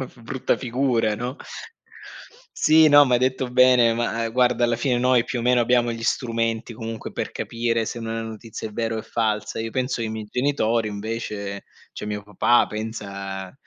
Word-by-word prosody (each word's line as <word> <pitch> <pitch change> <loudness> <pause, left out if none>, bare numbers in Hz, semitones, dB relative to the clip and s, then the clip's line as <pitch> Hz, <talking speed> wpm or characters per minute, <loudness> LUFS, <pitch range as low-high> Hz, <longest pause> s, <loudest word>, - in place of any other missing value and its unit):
f 125 -2 -8
brutta 130 +3 -1
figura, 120 -3 0
no? 125 +5 -4 1.2
Sì, 155 0 +6
no 145 -1 +8
ma 125 -2 +2
hai - - +4
detto 130 0 0
bene, 125 -2 +5
ma, 115 0 -1
uhm, - - -4
guarda 125 0 +2
alla 120 -1 +2
fine 125 +1 0
noi, 125 -1 +3
più 125 - -3
o - - -4
meno 125 0 +3
abbiamo 120 0 +2
gli 115 0 -5
strumenti 115 -1 -1
comunque 115 0 -6
per - - -4
capire 115 -1 -1
se 120 - -5
una 115 0 -4
notizia 110 0 -7
è - - -13
vera 115 0 -2
o 110 - -2
è - - -11
falsa. 110 -2 -2
Io 110 0 -4
penso 125 -1 -1
che 115 - -1
i 110 - -4
miei 110 -1 -6
genitori 120 -4 +1
invece 105 -1 -5 0.3
cioè - - -7
mio 105 0 -4
papà 105 +4 +2
pensa 100 -3 -6
115 Hz, 195 wpm, -23 LUFS, 110-125 Hz, 1.2 s, no